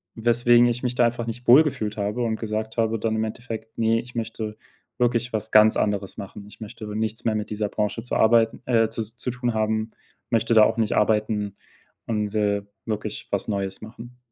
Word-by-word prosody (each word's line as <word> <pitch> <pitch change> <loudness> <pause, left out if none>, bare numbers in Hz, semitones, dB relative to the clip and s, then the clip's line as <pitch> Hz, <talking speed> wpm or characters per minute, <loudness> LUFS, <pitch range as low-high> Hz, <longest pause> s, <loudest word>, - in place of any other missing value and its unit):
weswegen 120 +1 +4
ich 120 +1 -2
mich 125 -1 -1
da 120 - +4
einfach 120 0 -1
nicht 120 +2 -6
wohlgefühlt 120 -6 +4
habe 105 +4 -1
und 110 -2 -1
gesagt 110 0 -4
habe 115 0 +1
dann 110 0 -1
im 110 - 0
Endeffekt: 110 0 -6
„Ne, 115 0 +2
ich 120 0 -15
möchte 110 -1 -4 0.4
wirklich 120 0 +1
was 110 0 -3
ganz 110 0 +6
anderes 100 -2 -1
machen. 100 +1 -8
Ich 105 - -16
möchte 110 0 -8
nichts 110 0 -3
mehr 110 -2 +1
mit 105 0 -3
dieser 105 0 -2
Branche 105 +2 -2
zu 125 - -2
arbeiten 115 0 +3
äh, 115 -3 +3
zus 110 0 -5
zu 125 - -3
tun 120 -1 -2
haben, 110 0 -1 0.4
möchte 115 0 +1
da 110 -1 +8
auch 105 - +2
nicht 110 -2 +1
arbeiten 105 -1 +1 0.5
und, 105 -2 -1
äh, 100 -1 +1 0.2
wirklich 110 -1 -4
was 100 - -1
Neues 100 -2 -2
machen.“ 120 +3 -11
110 Hz, 195 wpm, -24 LUFS, 105-120 Hz, 0.5 s, da